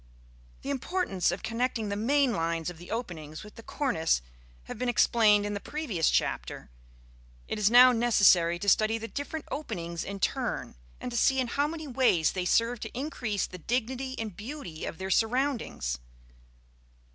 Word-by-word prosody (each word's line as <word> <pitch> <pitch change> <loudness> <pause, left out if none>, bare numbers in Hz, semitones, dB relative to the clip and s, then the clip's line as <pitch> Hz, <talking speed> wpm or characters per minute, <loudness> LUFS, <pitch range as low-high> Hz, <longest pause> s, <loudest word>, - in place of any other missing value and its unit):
The 280 - -3
importance 275 - 0
of 185 - -3
connecting 230 -2 -1
the 200 - -2
main 260 +4 +2
lines 165 -1 -1
of 165 - -14
the 175 - -12
openings 170 -9 -5
with 210 - -12
the - - -11
cornice 195 - 0 0.4
having - - -8
been 250 0 0
explained 215 -3 +4
in 205 - -2
the 205 - -3
previous 225 - -1
chapter, - - -1 0.8
it - - -3
is 205 -1 +4
now 250 +2 +8
necessary 200 -8 +4
to 200 - -6
study 215 +3 +4
the 225 0 -6
different 290 +4 -5
openings 170 - -4
in 200 0 -6
turn, - - -2 0.3
and 250 - -5
to 240 - -2
see 265 +3 +3
in 250 -2 0
how 285 +4 +1
many 315 -1 -6
ways 245 - +3
they 185 -1 -3
serve 230 +5 +2
to - - -7
increase 245 -7 -2
the 180 - -10
dignity 255 +6 -2
and 215 -5 -5
beauty 210 - -7
of - - -5
their 190 +1 -4
surroundings. 225 - 0
225 Hz, 170 wpm, -28 LUFS, 180-255 Hz, 0.8 s, now